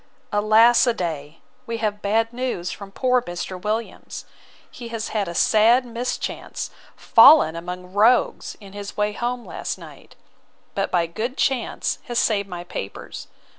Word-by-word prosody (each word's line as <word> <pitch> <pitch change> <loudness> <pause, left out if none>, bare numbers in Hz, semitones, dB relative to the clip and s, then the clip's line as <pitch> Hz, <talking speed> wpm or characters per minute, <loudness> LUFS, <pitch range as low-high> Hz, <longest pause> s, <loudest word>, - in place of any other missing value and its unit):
Alas 220 +4 +5
a 240 - +2
day! 160 -5 -5 0.3
we 230 0 -3
have 210 -2 -2
bad 225 +3 +1
news 240 -9 -3
from 200 -1 -9
poor 250 +3 +2
Mr. 180 -2 -6
Williams. 215 +3 -4 0.5
He 240 - -9
has 230 -1 -4
had 210 -3 -1
a 170 - -6
sad 230 +7 +4
mischance; 240 +1 -4 0.2
fallen 230 - +6
among 180 +2 -7
rogues 225 +5 +2
in 200 -2 -13
his 205 0 -8
way 210 0 +1
home 240 +2 -3
last - - -5
night: - - -14 0.6
but 195 - -1
by 175 -2 +1
good 220 +10 -4
chance 260 -4 -1
has 240 -1 -4
saved 200 -4 +1
my 175 -1 -6
papers. 100 - -7
215 Hz, 150 wpm, -22 LUFS, 185-235 Hz, 0.6 s, fallen